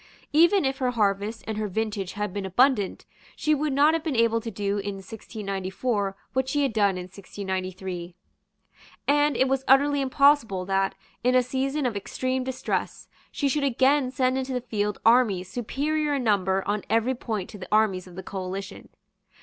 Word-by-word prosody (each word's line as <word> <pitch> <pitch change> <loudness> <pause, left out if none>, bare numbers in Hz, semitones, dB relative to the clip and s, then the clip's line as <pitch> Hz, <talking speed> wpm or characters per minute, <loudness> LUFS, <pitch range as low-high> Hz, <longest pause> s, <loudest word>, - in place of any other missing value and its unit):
Even 340 +3 +5
if 265 +1 -1
her 255 -2 +1
harvest 210 -1 0
and 215 +1 -3
her 215 - -1
vintage 205 -2 -3
had 210 -2 -3
been 200 - -3
abundant, 205 +2 +2 0.3
she 305 - +1
would 300 0 0
not 290 +3 +4
have 325 -1 -1
been 315 -5 -2
able 230 0 +3
to 230 - -5
do 205 -1 -2
in 200 0 -4
1694 195 +1 -3 0.2
what 260 0 0
she 290 +1 +1
had 270 -5 0
done 200 -3 +2
in 180 - -4
1693; 185 -2 -5 0.9
and 290 +1 +3
it 265 - +3
was 270 0 0
utterly 285 +1 +4
impossible 265 -8 +3
that, 195 0 0 0.3
in 250 +1 +3
a 255 - +5
season 270 +3 -1
of 240 -4 -1
extreme 255 +6 -2
distress, 255 0 -3 0.2
she 285 - -1
should 280 +2 0
again 270 +1 +3
send 255 0 +1
into 260 0 -3
the 250 - -1
field 210 -4 -2
armies 225 -6 +4
superior 290 +8 -1
in 270 - -1
number 190 -3 +1
on 205 0 0
every 230 +3 +2
point 220 -6 -4
to 210 - -10
the 185 - -8
armies 210 -4 +2
of 180 - -13
the 190 - -7
coalition. 190 +1 -6
225 Hz, 180 wpm, -26 LUFS, 195-265 Hz, 0.9 s, Even